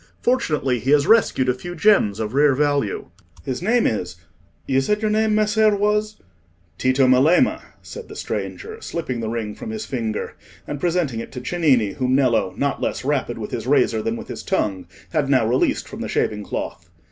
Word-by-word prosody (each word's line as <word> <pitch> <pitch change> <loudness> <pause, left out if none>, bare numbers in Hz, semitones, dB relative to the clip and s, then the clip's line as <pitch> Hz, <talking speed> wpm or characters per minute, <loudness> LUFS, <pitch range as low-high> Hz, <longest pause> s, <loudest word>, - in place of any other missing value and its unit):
Fortunately, 150 - +1
he 130 - -4
has 145 -1 +4
rescued 220 - +3
a 125 - +3
few 175 +8 -8
gems 160 - +3
of 110 0 -3
rare 140 0 +4
value. 145 -6 0 0.3
His 130 +2 -3
name 230 +6 +2
is—you 90 +7 -3
said 210 +10 0
your 215 -1 0
name, 215 0 +2
Messer, 215 0 +3
was—?" 210 +1 0 0.6
"Tito 130 +1 +3
Melema," 140 - +4 0.2
said 470 - -9
the - - -11
stranger, 445 0 -5
slipping 130 - -4
the 110 -1 -3
ring 110 -2 -3
from - - -8
his 220 0 -5
finger, 115 -5 -3 0.3
and 145 - -5
presenting 170 -9 0
it - - -7
to - - -5
Cennini, 130 - +2
whom 130 0 0
Nello, 120 -8 +2
not 140 -1 -1
less - - -2
rapid 135 -4 -1
with 110 -2 -6
his - - -4
razor 130 -5 +3
than 115 +1 -2
with - - -8
his - - -6
tongue, 95 -4 -1 0.2
had 150 -4 0
now 130 -5 +3
released 125 +4 +1
from - - -8
the - - -4
shaving 105 -1 -1
cloth. - - -6
135 Hz, 185 wpm, -21 LUFS, -, 0.6 s, has